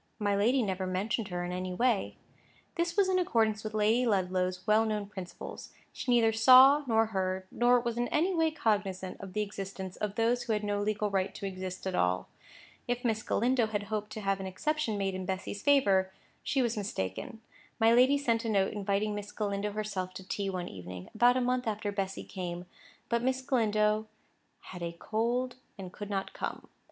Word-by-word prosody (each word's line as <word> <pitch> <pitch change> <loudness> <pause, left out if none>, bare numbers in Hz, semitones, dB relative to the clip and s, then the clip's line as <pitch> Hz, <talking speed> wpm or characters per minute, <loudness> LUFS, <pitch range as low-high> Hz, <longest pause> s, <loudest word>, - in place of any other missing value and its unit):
My 205 -2 +1
lady 240 +6 +3
never 190 -2 -2
mentioned 200 +4 -1
her 175 -2 -3
in 175 - -4
any 180 0 -3
way. 235 -1 +1 0.6
This 340 +2 -1
was 400 -2 +4
in 370 -1 +2
accordance 220 -9 +1
with 215 0 -5
Lady 215 +4 +3
Ludlow's 185 -2 0
well 215 +1 +4
known 215 -2 -1
principles. 190 -3 -8 0.2
She - - -6
neither 230 -2 +4
saw 260 +6 +8
nor 225 -1 +4
heard, 190 0 -1
nor 245 +1 +4
was 235 -1 -3
in 240 - +1
any 350 +5 +1
way 325 -2 +3
cognisant 205 -10 -1
of 195 -2 -8
the 210 - 0
existence 195 -2 -6
of 210 -1 -3
those 235 +2 +2
who 240 -2 -1
had 210 0 -1
no 205 0 -1
legal 210 0 -1
right 195 0 0
to - - -6
exist 185 -1 -5
at 190 - -2
all. 90 - 0 0.6
If 245 +1 -2
Miss 220 -2 +1
Galindo 245 0 +1
had 205 -1 -2
hoped 210 -1 -2
to 215 - -5
have 195 -1 0
an 190 - -4
exception 300 +3 -1
made 195 -1 -1
in 185 -1 -5
Bessy's 190 +1 -4
favour, 195 -10 +3 0.3
she 270 -3 +1
was 235 -1 0
mistaken. 195 - -4 0.4
My 225 0 +5
lady 255 +4 +5
sent 235 -5 0
a 230 - -2
note 195 -3 +2
inviting 205 +1 0
Miss 205 0 -6
Galindo 205 -1 -2
herself 195 -4 -3
to 190 0 -9
tea 200 0 -2
one 180 -2 -3
evening, 90 -1 -9
about 245 +3 +4
a - - +1
month 250 0 0
after 210 -1 -2
Bessy 195 -1 -3
came; 180 -2 -6 0.4
but 235 0 +1
Miss 260 +1 0
Galindo 215 -4 +1 0.5
"had 180 -1 -10
a 170 0 -3
cold 235 +7 -1 0.2
and 185 -2 -8
could 205 -1 -7
not 195 -1 -3
come." - - -5
210 Hz, 195 wpm, -30 LUFS, 190-235 Hz, 0.6 s, saw